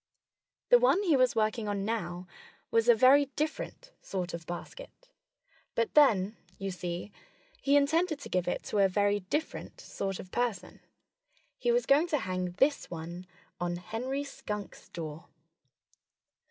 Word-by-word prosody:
The - - +8
one 445 -5 +4
he 335 -7 +4
was 255 -2 +3
working 215 0 0
on 200 -1 -1
now 180 -5 -3 0.5
was 230 +1 +3
a 240 - +8
very 265 +5 +6
different 315 +11 -4
sort 180 -3 -4
of 165 -1 -7
basket. - - -9 0.7
But 230 -1 0
then 215 -8 +4 0.2
you 195 0 -3
see, 180 +2 -5 0.5
he 280 +1 +3
intended 315 +3 +3
to - - -7
give 180 -1 0
it - - -1
to 210 - -1
a 195 - +6
very 205 +1 +2
different 295 - -4
sort 195 - -4
of 185 - -10
person. 240 -4 -2 0.8
He 485 - +2
was 485 +1 +2
going 290 +5 +4
to 315 -3 +1
hang 185 -5 -3
this 275 +9 +1
one 170 +2 -7 0.3
on 175 0 -1
Henry 250 +10 -3
Skunk's 210 -7 -7
door. 160 -1 -7
215 Hz, 150 wpm, -30 LUFS, 180-285 Hz, 0.8 s, The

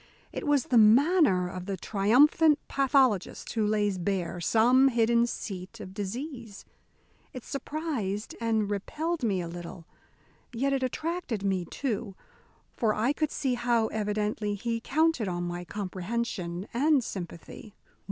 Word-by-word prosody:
It - - -5
was 290 -3 +3
the 245 - +3
manner 235 - +5
of 180 +1 -7
the 195 -1 -2
triumphant 270 - +4
pathologist 265 -7 +1
who 220 -2 +1
lays 205 -3 +1
bare 180 -1 -2
some 245 +8 +4
hidden 235 -1 +3
seat 185 -5 -6
of 185 - -9
disease. 230 +2 -6 0.7
It 255 - -8
surprised 275 - -4
and 220 -2 +1
repelled 310 - -2
me 195 -5 +1
a 170 - -5
little; 170 0 -8 0.7
yet 275 +4 0
it 270 - 0
attracted 260 - -3
me, 190 -3 0
too, 220 - -4 0.6
for 220 -3 +1
I 235 +6 +1
could 310 0 -1
see 270 -4 -1
how 240 -2 +1
evidently 210 0 -1
he 230 +2 -2
counted 305 -3 +1
on 175 -1 -2
my 175 0 -4
comprehension 190 -1 -4
and 280 +2 +3
sympathy. 190 +2 -8
220 Hz, 135 wpm, -28 LUFS, 195-265 Hz, 0.7 s, manner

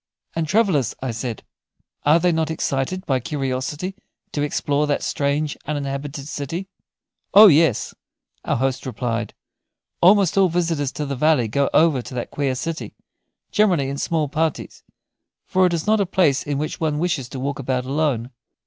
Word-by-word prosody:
"And 165 -1 -1
travellers," 185 - +2
I 130 - -1
said, 115 0 -5 0.6
"are 155 +3 +6
they 180 +1 +2
not 160 -1 0
excited 160 +4 -2
by 130 -2 +1
curiosity 135 +6 -3 0.4
to 145 - -2
explore 145 0 0
that 145 - 0
strange 145 +1 -1
uninhabited 140 -1 -4
city?" 160 +6 -4 0.7
"Oh 210 +2 +11
yes," 160 - +4 0.5
our - - 0
host 130 +1 -1
replied; 120 -3 -3 0.7
"almost 195 0 +5
all 190 -2 +5
visitors 165 -5 0
to 150 - -3
the 140 0 -3
valley 145 -3 +3
go 140 +6 +1
over 155 -5 +4
to 125 - -9
that 120 - -4
queer 140 -3 -1
city 160 +5 -5 0.6
generally 180 -10 +2
in 140 0 -4
small 160 -3 0
parties, 155 +2 -2 0.6
for 185 0 +3
it 175 - -2
is 160 - -3
not 215 0 +3
a 195 - 0
place 165 -7 +2
in 145 -2 -3
which 150 +2 -3
one 155 -2 0
wishes 155 -6 -1
to 130 - -6
walk 140 +2 -3
about 130 -1 -1
alone. 135 -4 -1
145 Hz, 165 wpm, -22 LUFS, 135-165 Hz, 0.7 s, Oh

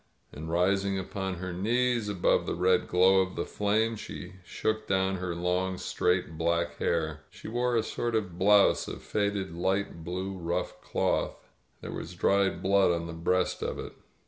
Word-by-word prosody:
And, 80 +2 -7
rising 95 +3 +1
upon 95 0 -3
her 90 +1 -5
knees 120 +3 +1
above 95 -4 +2
the - - -1
red 90 +1 +2
glow 95 +2 +5
of 95 0 -3
the - - -2
flames, 110 +2 0
she 90 -2 -8
shook 110 +4 -2
down 95 0 +1
her 90 -1 -3
long, 90 +2 0
straight 90 -3 0
black 85 0 0
hair.* 80 -2 -1
She - - -11
wore 120 +2 0
a 115 - +2
sort 120 +1 -2
of 90 -6 -2
blouse 100 +1 +5
of - - -7
faded 100 -3 -1
light 95 -1 -1
blue 95 +3 -4
rough 85 0 -3
cloth. - - -1 0.3
There - - -6
was 85 +3 -6
dried 95 0 +2
blood 100 0 +4
on 85 -1 -1
the 85 - -6
breast 90 +3 0
of - - -2
it. - - -7
95 Hz, 170 wpm, -29 LUFS, 85-100 Hz, 0.3 s, glow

